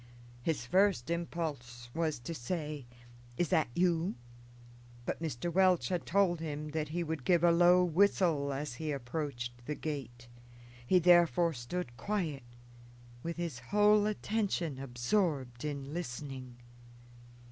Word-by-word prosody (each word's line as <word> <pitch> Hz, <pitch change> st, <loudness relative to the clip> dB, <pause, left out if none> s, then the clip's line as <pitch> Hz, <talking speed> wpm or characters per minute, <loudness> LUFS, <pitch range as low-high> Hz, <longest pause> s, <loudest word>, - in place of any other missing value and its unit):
His 140 Hz, -2 st, -1 dB
first 185 Hz, -1 st, +2 dB
impulse 145 Hz, -9 st, -4 dB
was 160 Hz, -2 st, 0 dB
to 165 Hz, -, -5 dB
say, 150 Hz, -1 st, -4 dB, 0.5 s
"Is 175 Hz, -, +1 dB
that 155 Hz, -, +3 dB
you?" 175 Hz, -1 st, +2 dB, 0.9 s
but -, -, -3 dB
Mr. 165 Hz, +2 st, -3 dB
Welch 185 Hz, -1 st, +4 dB
had 180 Hz, -2 st, -2 dB
told 180 Hz, -2 st, +3 dB
him 150 Hz, -1 st, -4 dB
that 155 Hz, 0 st, -2 dB
he 175 Hz, +2 st, -1 dB
would 160 Hz, -4 st, -4 dB
give 175 Hz, +1 st, +3 dB
a 170 Hz, -, +6 dB
low 175 Hz, +2 st, +6 dB
whistle 170 Hz, -5 st, +2 dB
as 140 Hz, 0 st, -3 dB
he 155 Hz, +4 st, -3 dB
approached 120 Hz, -3 st, -4 dB
the 150 Hz, -, -2 dB
gate; 125 Hz, -6 st, -6 dB, 0.6 s
he 185 Hz, -, +5 dB
therefore 175 Hz, -2 st, +5 dB
stood 120 Hz, 0 st, -5 dB
quiet, 165 Hz, -, -2 dB, 0.8 s
with 170 Hz, +3 st, -4 dB
his 170 Hz, -8 st, -3 dB
whole 210 Hz, -, +4 dB
attention 200 Hz, -9 st, -1 dB
absorbed 130 Hz, -, -1 dB
in 140 Hz, -1 st, -4 dB
listening. 130 Hz, -5 st, -6 dB
160 Hz, 130 wpm, -32 LUFS, 135-175 Hz, 0.9 s, a